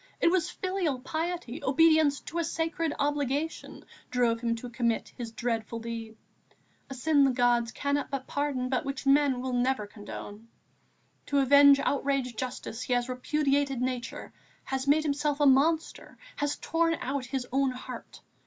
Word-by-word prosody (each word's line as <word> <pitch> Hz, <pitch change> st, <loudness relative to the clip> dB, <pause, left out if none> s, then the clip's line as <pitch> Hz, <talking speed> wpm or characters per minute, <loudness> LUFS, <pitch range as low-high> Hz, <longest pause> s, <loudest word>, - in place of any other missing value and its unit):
It 335 Hz, -, +4 dB
was 360 Hz, -3 st, +1 dB
filial 370 Hz, -7 st, -2 dB
piety, 320 Hz, -2 st, -4 dB
obedience 300 Hz, +1 st, +4 dB
to 340 Hz, -, -5 dB
a -, -, +1 dB
sacred 330 Hz, 0 st, -1 dB
obligation, 290 Hz, +1 st, -2 dB, 0.2 s
drove 240 Hz, -2 st, +1 dB
him 230 Hz, -1 st, 0 dB
to 230 Hz, +2 st, -7 dB
commit 235 Hz, -1 st, -1 dB
his 235 Hz, -2 st, -6 dB
dreadful 230 Hz, -1 st, -3 dB
deed, 230 Hz, -1 st, -6 dB, 0.7 s
a 270 Hz, -, -6 dB
sin 285 Hz, +2 st, +3 dB
the 270 Hz, -, +5 dB
gods 245 Hz, -2 st, +2 dB
cannot 285 Hz, +2 st, -1 dB
but 270 Hz, -1 st, -4 dB
pardon, 285 Hz, -3 st, -2 dB
but 255 Hz, +1 st, 0 dB
which 275 Hz, 0 st, -5 dB
men 275 Hz, -2 st, +3 dB
will 255 Hz, 0 st, -3 dB
never 245 Hz, -2 st, +1 dB
condone. 205 Hz, +1 st, -9 dB, 0.8 s
To 285 Hz, -, 0 dB
avenge 280 Hz, +1 st, +7 dB
outraged 275 Hz, -3 st, 0 dB
justice, 245 Hz, -1 st, -5 dB
he 250 Hz, -, -1 dB
has 245 Hz, 0 st, 0 dB
repudiated 275 Hz, +1 st, 0 dB
Nature, 250 Hz, -1 st, -4 dB, 0.3 s
has 265 Hz, 0 st, -3 dB
made 300 Hz, +2 st, +4 dB
himself 290 Hz, 0 st, 0 dB
a 290 Hz, -, +4 dB
monster, 300 Hz, +4 st, +2 dB, 0.2 s
has 290 Hz, 0 st, -1 dB
torn 330 Hz, 0 st, +1 dB
out 270 Hz, 0 st, -3 dB
his 260 Hz, -1 st, -3 dB
own 270 Hz, +1 st, +2 dB
heart. 255 Hz, 0 st, -8 dB
275 Hz, 155 wpm, -28 LUFS, 245-290 Hz, 0.8 s, avenge